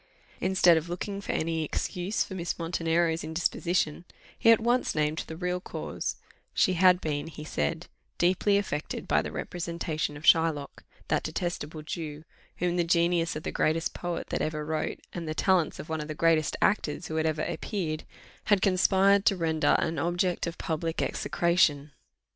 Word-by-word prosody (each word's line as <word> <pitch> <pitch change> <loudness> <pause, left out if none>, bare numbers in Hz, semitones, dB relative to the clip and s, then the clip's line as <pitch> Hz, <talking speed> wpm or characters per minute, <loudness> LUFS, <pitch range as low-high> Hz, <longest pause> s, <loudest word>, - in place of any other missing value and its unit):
Instead 185 -3 +4
of 160 +2 -3
looking 195 +3 -4
for - - -3
any 160 0 -1
excuse 180 +6 -1
for - - -9
Miss 175 -2 -3
Montenero's 165 -1 0
indisposition, 170 0 -1 0.3
he - - +3
at 230 - +7
once 240 -1 +1
named 155 +1 0
the 160 - -7
real 180 0 -1
cause; - - -4 0.4
she 185 - +3
had 180 0 +5
been, 150 -3 -2
he 155 -1 -8
said, 75 - -2 0.3
deeply 185 +3 +3
affected 150 -7 -3
by - - +3
the - - -5
representation 165 -3 -3
of 145 - -12
Shylock; 160 -4 +3 0.3
that - - +2
detestable 160 -3 -4
Jew, 155 -1 -5 0.3
whom 175 0 0
the 175 - +3
genius 170 0 +2
of 155 - -5
the - - -3
greatest 165 +1 0
poet 175 -1 -4
that - - -1
ever 155 -1 -2
wrote, 155 0 -2
and 170 -2 -5
the 155 - -3
talents 185 -4 +2
of - - -8
one 160 -1 -2
of 150 - -6
the 155 - -5
greatest 160 -1 +2
actors 160 -5 +1
who 160 - -4
had 160 0 +2
ever 155 -1 -1
appeared, 160 -7 -3 0.4
had 205 -2 +3
conspired 195 +1 +4
to 200 -4 +4
render 160 -2 +2
an 165 -2 -1
object 175 +2 0
of 170 - -5
public 165 0 -2
execration. 155 -4 +1
165 Hz, 170 wpm, -28 LUFS, 155-180 Hz, 0.4 s, at